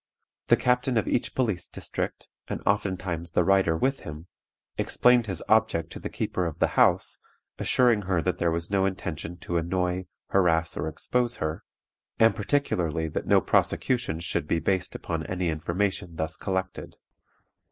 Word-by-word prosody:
The - - +6
captain 125 0 +1
of 110 - +1
each 120 - 0
police 110 -9 0
district - - -5 0.2
(and - - -3
oftentimes 95 -4 -1
the 85 - +2
writer 95 -3 +3
with 135 +8 +1
him) 75 +2 -8 0.5
explained 125 -2 +3
his 95 -5 -4
object 85 -7 +2
to - - -7
the - - -5
keeper 90 -2 -2
of 80 - -6
the - - +2
house, - - +3 0.4
assuring 120 -5 +3
her 90 -3 +2
that 90 +2 -1
there 85 - +2
was 85 +2 -2
no 95 -1 +3
intention 90 -2 -5
to 85 - -2
annoy, 90 +2 -1 0.2
harass, 80 -4 +2
or - - -2
expose 120 +9 0
her; 80 0 -3 0.5
and, 115 0 +5
particularly, 90 - 0
that - - -4
no - - +5
prosecutions 100 -10 +1
should 80 -3 -1
be 85 - +1
based 95 +1 -1
upon 80 -1 -3
any 90 -2 -1
information 85 +2 -2
thus 80 0 -3
collected. 95 +1 -4
90 Hz, 160 wpm, -27 LUFS, 85-105 Hz, 0.5 s, The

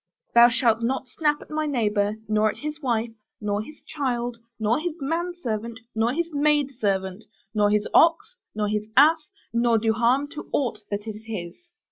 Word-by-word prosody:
Thou 235 0 +8
shalt 230 -2 +2
not 260 +2 -1
snap 295 -2 0
at - - -18
my 310 0 -1
neighbor, 210 -6 +1
nor 215 0 +2
at - - -6
his 300 +1 -6
wife, 235 -4 0 0.3
nor 205 0 -1
his 300 +8 -12
child, 245 -5 -3 0.2
nor 220 +4 +2
his 330 0 -3
manservant, 275 -8 -3
nor 225 +2 +1
his 335 +3 -2
maidservant, 235 -10 0 0.3
nor 210 -1 +3
his 210 0 +1
ox, 410 +9 +4 0.2
nor 210 -1 0
his 210 0 -2
ass, 305 +2 +5 0.2
nor 235 0 +3
do 220 0 +1
harm 245 +5 +2
to 300 0 -9
aught 260 -4 0
that 205 +1 -3
is 215 0 -7
his. 180 -6 -5
235 Hz, 170 wpm, -25 LUFS, 215-295 Hz, 0.3 s, Thou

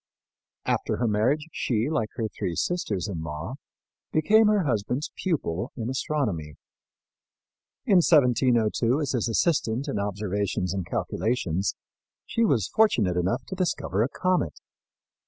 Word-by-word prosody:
After - - 0
her 120 - 0
marriage 120 +8 +1
she, 115 -4 0
like 115 -9 -1
her 115 - -1
three 90 -4 -4
sisters 105 - -1
in 90 -6 -4
law, 80 - -5 0.5
became 215 +8 +5
her 210 -2 +3
husband's 125 +2 -1
pupil 130 - -2
in 115 +1 -3
astronomy. 105 - -2 1.3
In 195 - +5
1702, 125 -5 +3
as 145 -4 -1
his 120 -2 0
assistant 130 -1 +1
in 135 -7 -2
observations 100 -2 -2
and 95 -4 -3
calculations, 95 -6 -1 0.5
she 230 - 0
was 125 - +2
fortunate 115 - +3
enough 95 +9 0
to - - -6
discover 170 - -1
a 120 - +2
comet. 180 - 0
115 Hz, 130 wpm, -26 LUFS, 100-150 Hz, 1.3 s, became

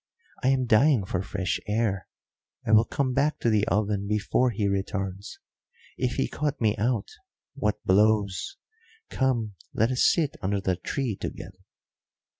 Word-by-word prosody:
I - - +1
am 130 -1 +3
dying 120 -1 +4
for 90 -1 -2
fresh 95 -1 -2
air. 105 -3 0 0.6
I - - 0
will 110 +1 +6
come 130 +1 -1
back 145 +4 +1
to 115 - +2
the 105 -1 +2
oven 100 +1 0
before 105 +4 +1
he 105 -3 -1
returns. 100 0 -3 0.6
If 125 -1 -1
he 135 - 0
caught 150 -1 -2
me 110 -2 +2
out, 115 0 0 0.4
what - - -2
blows! 100 -1 +2 0.5
Come, 120 -6 0 0.2
let 115 +3 +2
us 130 - +4
sit 155 -5 -1
under 100 +1 0
the 95 -2 0
tree 115 +6 -3
together." - - -7
110 Hz, 150 wpm, -26 LUFS, 100-125 Hz, 0.6 s, will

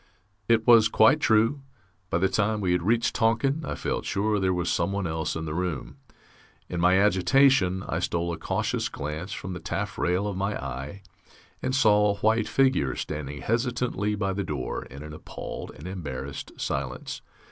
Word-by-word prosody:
It 115 -1 +3
was 115 -3 +7
quite 110 +6 +5
true. 115 +2 +3 0.5
By - - +1
the 95 +2 +3
time 105 +2 0
we 95 -3 0
had 90 - +2
reached 115 +6 +1
Tonking, 125 +6 +1
I - - -3
felt - - -2
sure 105 +1 0
there 95 -1 +1
was 90 -1 -1
someone 100 -1 0
else 80 -1 -2
in 80 0 -4
the 75 - -4
room. 85 -5 -3 0.7
In 90 - -4
my 90 +2 +4
agitation 95 0 +4
I 80 - -1
stole 85 -1 -1
a - - -5
cautious - - -1
glance 75 +6 -5
from 90 - -5
the 90 - -5
taff - - -4
rail 90 +3 +1
of 100 -2 -2
my 100 +2 -2
eye 70 +10 -6 0.6
and 130 - -1
saw 105 -5 +4
a - - -18
white 110 0 +2
figure 130 - +2
standing 75 -1 -5
hesitantly 115 -3 0
by 100 -2 -1
the 100 +1 -2
door, 70 -8 -4
in 70 +3 -10
an 75 0 -8
appalled 75 - -7
and 75 +4 -9
embarrassed 70 -7 -6
silence. 70 -2 -3
95 Hz, 180 wpm, -26 LUFS, 80-110 Hz, 0.7 s, was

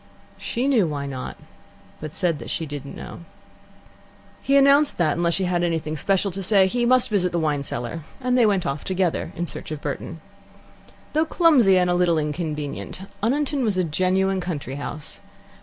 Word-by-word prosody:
She 245 +3 -2
knew 235 -10 +3
why 145 -2 -3
not, 130 -2 -6 0.6
but 155 -1 -6
said 170 -3 -1
that - - -8
she 165 - -2
did 145 -2 -7
not - - -9
know. - - -8 1.2
He 275 - +1
then 275 -1 +7
announced 285 +1 +4
that, 155 -4 +2
unless 170 0 +1
she 195 - -1
had 175 -1 0
anything 160 -2 -1
special 195 +5 0
to 195 +2 -5
say, 195 0 +4
he 240 +5 0
must 255 0 +5
visit 180 -4 +2
the 175 - -1
wine 150 -3 0
cellar, 130 +4 -4 0.2
and 250 -1 0
they 240 -3 +5
went 195 -4 +1
off 140 +1 -3
together 185 -2 -1
in 175 - -2
search - - -7
of 155 -1 -5
Burton. 150 +3 -5 0.9
Though 310 +2 +2
clumsy 290 - +5
and 180 -1 +3
a 175 - +2
little 175 -2 +2
inconvenient, 150 +2 -4 0.2
Oniton 275 +4 0
was 210 -5 0
a 185 - +2
genuine 185 +3 +1
country 145 -6 -4
house. 145 +1 -7
180 Hz, 190 wpm, -23 LUFS, 155-210 Hz, 1.2 s, then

